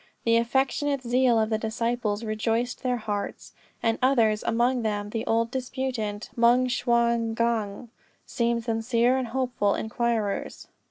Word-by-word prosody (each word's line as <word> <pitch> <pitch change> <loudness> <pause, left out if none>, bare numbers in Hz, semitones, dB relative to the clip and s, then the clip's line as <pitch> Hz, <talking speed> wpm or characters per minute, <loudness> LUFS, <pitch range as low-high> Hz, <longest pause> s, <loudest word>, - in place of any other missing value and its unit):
The 230 0 +4
affectionate 270 +3 0
zeal 245 0 +3
of 220 0 0
the 220 - +1
disciples 230 -1 -2
rejoiced 225 +2 -1
their 250 -2 0
hearts; 210 -3 -5 0.3
and 225 -1 +1
others, 230 -5 +3
and - - -1
among 245 +2 +2
them 210 -2 -2
the 225 0 -2
old 230 +1 +1
disputant, 250 -5 -3
Moung 240 +2 +4
Shwa 235 -2 +1
gnong, 230 -1 -1 0.4
seemed 235 -2 -1
sincere 230 +2 +1
and 260 -2 -1
hopeful 240 -4 0
inquirers. 220 -2 -2
235 Hz, 140 wpm, -26 LUFS, 220-245 Hz, 0.4 s, The